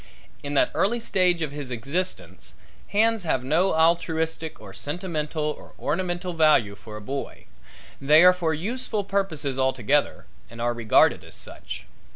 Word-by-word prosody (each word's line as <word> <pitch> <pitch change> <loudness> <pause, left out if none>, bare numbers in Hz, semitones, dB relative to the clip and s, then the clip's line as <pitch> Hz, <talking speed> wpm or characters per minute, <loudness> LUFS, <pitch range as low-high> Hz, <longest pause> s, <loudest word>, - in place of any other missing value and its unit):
In 145 0 -4
that - - +3
early 235 +4 +1
stage 180 -6 +1
of 150 - -3
his 145 -2 -6
existence 140 +10 -3 0.3
hands 225 0 +2
have 135 -6 0
no 160 +8 +2
altruistic 160 -1 +1
or - - -11
sentimental 155 -1 -3
or 150 0 -5
ornamental 175 +2 -2
value 155 -11 +4
for 105 +1 -10
a - - -9
boy 135 +6 -6 0.6
they 150 +4 +6
are 180 0 +8
for 175 -3 -1
useful 215 +6 -2
purposes 165 -9 -1
altogether 130 +2 +1 0.2
and 115 - -12
are 120 +1 0
regarded 115 -2 +3
as - - -12
such. - - -6
160 Hz, 150 wpm, -25 LUFS, 140-180 Hz, 0.6 s, are